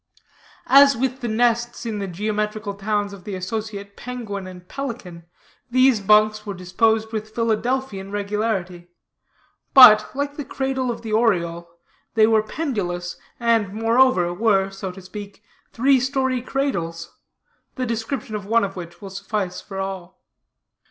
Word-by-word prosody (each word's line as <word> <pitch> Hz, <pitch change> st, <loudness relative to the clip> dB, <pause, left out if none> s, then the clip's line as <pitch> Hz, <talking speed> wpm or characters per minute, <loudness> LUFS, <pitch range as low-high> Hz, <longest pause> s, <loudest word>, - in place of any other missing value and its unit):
As 280 Hz, 0 st, +7 dB
with 260 Hz, +2 st, -2 dB
the 240 Hz, -, -2 dB
nests 235 Hz, +1 st, 0 dB
in 220 Hz, -3 st, -3 dB
the 200 Hz, -, -3 dB
geometrical 210 Hz, +2 st, -2 dB
towns 205 Hz, 0 st, -2 dB
of 195 Hz, -2 st, -11 dB
the 205 Hz, -2 st, -5 dB
associate 200 Hz, +1 st, -5 dB
penguin 220 Hz, -6 st, -6 dB
and 180 Hz, -1 st, -11 dB
pelican, 200 Hz, -11 st, -7 dB, 0.4 s
these 255 Hz, -1 st, +4 dB
bunks 215 Hz, +1 st, +4 dB
were 205 Hz, -2 st, -5 dB
disposed 220 Hz, +5 st, +1 dB
with 215 Hz, 0 st, -5 dB
Philadelphian 230 Hz, -2 st, -1 dB
regularity, 200 Hz, -4 st, -2 dB, 0.9 s
but, 215 Hz, -5 st, +9 dB
like 285 Hz, +1 st, -3 dB
the 295 Hz, -, -3 dB
cradle 265 Hz, -2 st, -2 dB
of 235 Hz, -, -4 dB
the 220 Hz, -1 st, -4 dB
oriole, 170 Hz, -7 st, +1 dB, 0.5 s
they 220 Hz, -1 st, +6 dB
were 220 Hz, -1 st, +4 dB
pendulous, 200 Hz, -, -3 dB, 0.2 s
and, 230 Hz, -4 st, +1 dB
moreover, 225 Hz, -5 st, +3 dB
were, 195 Hz, -1 st, +2 dB
so 195 Hz, -1 st, -6 dB
to 190 Hz, +1 st, -12 dB
speak, 205 Hz, +1 st, -10 dB, 0.3 s
three 265 Hz, +3 st, +3 dB
story 260 Hz, -1 st, 0 dB
cradles; 200 Hz, -12 st, -3 dB, 0.6 s
the 255 Hz, -, -2 dB
description 230 Hz, +2 st, -3 dB
of 205 Hz, -2 st, -5 dB
one 230 Hz, +1 st, +3 dB
of 195 Hz, -1 st, -3 dB
which 175 Hz, 0 st, -9 dB
will 195 Hz, -, -7 dB
suffice 195 Hz, -1 st, -3 dB
for 195 Hz, -, -9 dB
all. 190 Hz, -2 st, -6 dB
215 Hz, 145 wpm, -22 LUFS, 195-240 Hz, 0.9 s, but